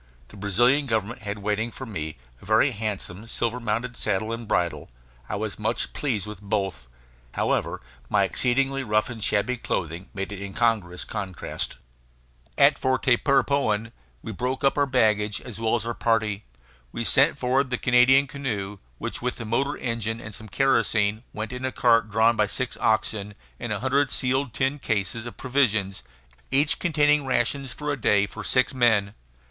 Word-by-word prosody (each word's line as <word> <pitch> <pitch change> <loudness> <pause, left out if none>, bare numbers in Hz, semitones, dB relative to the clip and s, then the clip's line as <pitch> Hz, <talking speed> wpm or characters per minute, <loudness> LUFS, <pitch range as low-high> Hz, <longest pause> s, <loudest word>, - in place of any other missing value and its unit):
The - - -11
Brazilian 120 +8 +2
Government 110 -1 -1
had 100 -1 -4
waiting 105 +3 -1
for 130 - -8
me 80 - -5 0.2
a - - -14
very 110 +7 +4
handsome 105 -2 -4
silver 120 +1 -1
mounted 115 +2 -2
saddle 110 +1 -1
and 115 -1 -6
bridle; 80 -6 -1 0.4
I - - -2
was - - -4
much - - -1
pleased 115 -10 -1
with 105 -2 -8
both. 95 - -2 0.5
However, - - 0 0.3
my - - +3
exceedingly 135 +2 +1
rough 110 +1 +1
and 115 -3 -6
shabby 125 +5 +2
clothing 85 -4 -3
made 95 0 -4
an 100 -1 -6
incongruous 100 -3 0
contrast. 95 - -5 0.8
At - - +5
Tapirapoan 130 -3 +2 0.3
we - - -5
broke 125 +5 -3
up 135 - +3
our 145 -1 +2
baggage 105 -5 +2
as 120 -3 -9
well 115 0 +1
as 115 -2 -2
our 120 - -2
party. 110 -3 0 0.5
We 115 - -3
sent 140 +4 +4
forward 130 +1 +1
the 125 - -1
Canadian 125 +3 +5
canoe 105 -8 -4 0.2
which, - - -4
with 125 0 -1
the 115 - -7
motor 135 +6 0
engine 115 -2 -2
and 105 -2 -9
some 110 +2 -9
kerosene, 110 -4 +2
went 110 +3 -5
in 125 +1 -5
a 130 - -1
cart 115 -1 +3
drawn 110 +2 +4
by 105 -1 +2
six 130 +5 -3
oxen 105 -2 0 0.2
and 120 -2 -4
a 105 0 -2
hundred 135 +2 +2
sealed 130 -2 0
tin 135 +2 0
cases 110 0 -2
of 120 - -9
provisions, 110 -8 +1 0.5
each 145 +3 +2
containing 150 -3 +3
rations 130 +1 0
for 150 +3 -3
a 140 -4 -4
day 100 -1 +4
for 105 +1 -8
six 130 +6 +2
men. 110 -6 +3
115 Hz, 170 wpm, -25 LUFS, 105-130 Hz, 0.8 s, At